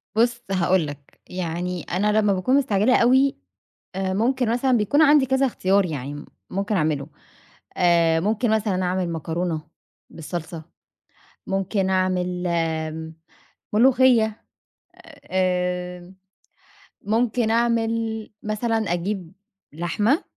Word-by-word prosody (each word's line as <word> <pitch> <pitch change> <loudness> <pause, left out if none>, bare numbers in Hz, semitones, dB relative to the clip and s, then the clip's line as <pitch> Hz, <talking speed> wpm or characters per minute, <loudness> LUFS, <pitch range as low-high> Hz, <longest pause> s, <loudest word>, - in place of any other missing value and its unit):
بُص 235 +1 +2
هاقول 185 -3 +2
لك، 145 -1 -11
يعني 180 0 -3
أنا 205 +4 0
لمّا 205 -2 +2
باكون 190 +8 +1
مستعجلة 250 -3 +3
أوي، 265 +3 +4 0.6
آآ 190 0 -2
ممكن 245 +4 +1
مثلًا 255 +2 +1
بيكون 245 +6 +3
عندي 290 -3 +5
كذا 265 +1 +2
اختيار 195 -5 +1
يعني 145 -1 -6 0.3
ممكن 200 +2 -1
أعمله. 150 -3 0 0.7
آآ 170 -2 +3
ممكن 220 +6 0
مثلًا 205 -4 0
أعمل 180 0 -1
مكرونة 165 0 -3 0.5
بالصلصة، 165 0 -7 0.8
ممكن 195 0 -1
أعمل 180 -1 0
امم 160 -1 -2 0.6
ملوخية، 235 -2 +3 0.9
امم 180 -1 -1 0.9
ممكن 225 +1 0
أعمل 230 -1 0
مثلًا 220 +2 -1 0.2
أجيب 180 0 -4 0.4
لحمة 205 - 0
190 Hz, 105 wpm, -23 LUFS, 175-225 Hz, 0.9 s, عندي